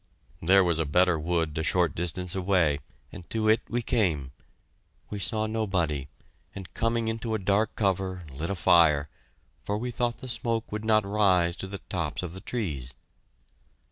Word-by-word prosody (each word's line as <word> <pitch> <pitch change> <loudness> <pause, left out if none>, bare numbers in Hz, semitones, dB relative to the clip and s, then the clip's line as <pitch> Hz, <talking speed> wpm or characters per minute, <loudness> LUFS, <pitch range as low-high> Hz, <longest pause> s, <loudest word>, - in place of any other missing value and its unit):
There 95 +4 +5
was 85 -3 +1
a 80 - +1
better 90 +2 +3
wood 80 -1 -1
a - - +1
short 85 +2 +2
distance 90 +1 -2
away, 90 -6 +2 0.3
and 85 - -11
to 110 -1 -1
it 110 +1 +4
we 120 +1 -1
came. 80 - 0 0.8
We 105 - -4
saw 110 +2 -1
nobody, 95 -11 -1 0.5
and, 95 -5 -9
coming 115 0 0
into 110 0 -2
a - - +1
dark 100 +2 +1
cover, 95 -2 -1
lit 80 +6 -4
a 100 - -1
fire, 80 -4 +4 0.5
for 105 - -2
we 125 +3 -3
thought 120 0 -1
the 130 - -9
smoke 115 -2 -2
would 105 +1 -4
not 110 -2 +3
rise 95 -4 +3
to 95 - -5
the 100 0 -7
tops 85 -2 -2
of 85 -2 -5
the 95 - -8
trees. 75 - -4
95 Hz, 170 wpm, -27 LUFS, 85-110 Hz, 0.8 s, There